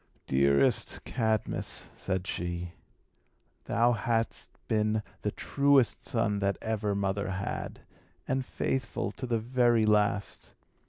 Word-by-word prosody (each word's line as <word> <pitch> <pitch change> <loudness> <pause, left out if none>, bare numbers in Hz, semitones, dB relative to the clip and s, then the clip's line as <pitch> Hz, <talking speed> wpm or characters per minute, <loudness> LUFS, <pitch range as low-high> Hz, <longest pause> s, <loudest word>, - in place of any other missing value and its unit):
"Dearest 70 +1 +2
Cadmus," 110 -3 -1
said 95 0 -2
she, 85 -1 -4 0.9
"thou 120 +2 +3
hast 115 -1 -1 0.2
been 110 0 +1 0.2
the 105 - 0
truest 140 +2 +2
son 115 -5 0
that 100 -1 0
ever 105 -2 -1
mother 100 0 -1
had, 95 +1 -4 0.5
and 130 0 0
faithful 125 -6 -2
to 130 - -6
the 120 -1 +1
very 120 -1 +3
last. 105 -1 +1
110 Hz, 110 wpm, -30 LUFS, 100-115 Hz, 0.9 s, thou